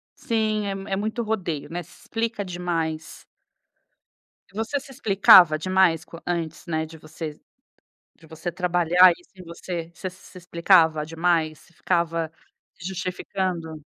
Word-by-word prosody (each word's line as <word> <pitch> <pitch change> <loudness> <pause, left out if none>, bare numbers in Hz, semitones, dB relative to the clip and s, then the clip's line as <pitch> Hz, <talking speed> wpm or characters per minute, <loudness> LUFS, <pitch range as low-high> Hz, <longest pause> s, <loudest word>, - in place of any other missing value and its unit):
Sim, 215 -2 -1
é 200 - -2
m 195 0 -8
é 195 - 0
muito 220 +4 -2
rodeio, 185 -9 -3
né? 175 +1 -4
Se - - -19
explica 230 -2 -2
demais. 170 -3 -4 1.3
Você 225 +7 -2
se 270 - -14
explicava 195 - +6
demais 185 -2 +2
co 165 - -12
antes, 165 -2 -3
né, 160 -1 -1
de 160 +1 -12
vocês 155 -1 -8 0.8
de 160 - -18
você 160 +2 -5
trabalhar 175 0 +5
isso 175 - -23
em 185 - -11
você? 170 0 -6
Você 185 - -5
se 185 - -14
se 185 - -11
explicava 170 -3 +3
demais? 165 -1 0
Você - - -22
ficava 165 -2 -1 0.5
se 175 - -8
justificando? 185 -4 -4
175 Hz, 145 wpm, -24 LUFS, 160-190 Hz, 1.3 s, explicava